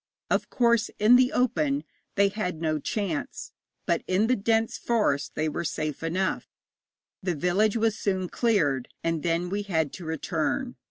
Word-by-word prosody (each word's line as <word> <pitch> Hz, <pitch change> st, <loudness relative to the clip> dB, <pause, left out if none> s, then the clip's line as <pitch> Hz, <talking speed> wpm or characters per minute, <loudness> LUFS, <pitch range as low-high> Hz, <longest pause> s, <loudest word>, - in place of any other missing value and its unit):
Of -, -, +1 dB
course, 235 Hz, -3 st, +2 dB
in 215 Hz, +4 st, +6 dB
the 250 Hz, 0 st, +5 dB
open 155 Hz, -, +1 dB, 0.3 s
they 200 Hz, 0 st, +4 dB
had 190 Hz, -5 st, -3 dB
no 155 Hz, -2 st, 0 dB
chance, 275 Hz, -, -3 dB, 0.3 s
but -, -, +1 dB
in 185 Hz, +4 st, +2 dB
the 255 Hz, +3 st, +3 dB
dense 225 Hz, +1 st, +1 dB
forest 210 Hz, -12 st, 0 dB
they 155 Hz, -, 0 dB
were 155 Hz, +3 st, -2 dB
safe 155 Hz, -3 st, -3 dB
enough. 180 Hz, +4 st, -1 dB, 0.7 s
The 180 Hz, -2 st, -1 dB
village 190 Hz, +8 st, +2 dB
was 225 Hz, -1 st, +1 dB
soon 190 Hz, -2 st, 0 dB
cleared, 160 Hz, -, +1 dB, 0.2 s
and 165 Hz, -2 st, 0 dB
then 170 Hz, +2 st, 0 dB
we 205 Hz, +1 st, -1 dB
had 160 Hz, -7 st, -1 dB
to 185 Hz, -, -8 dB
return. 160 Hz, -, -2 dB
190 Hz, 160 wpm, -27 LUFS, 160-225 Hz, 0.7 s, in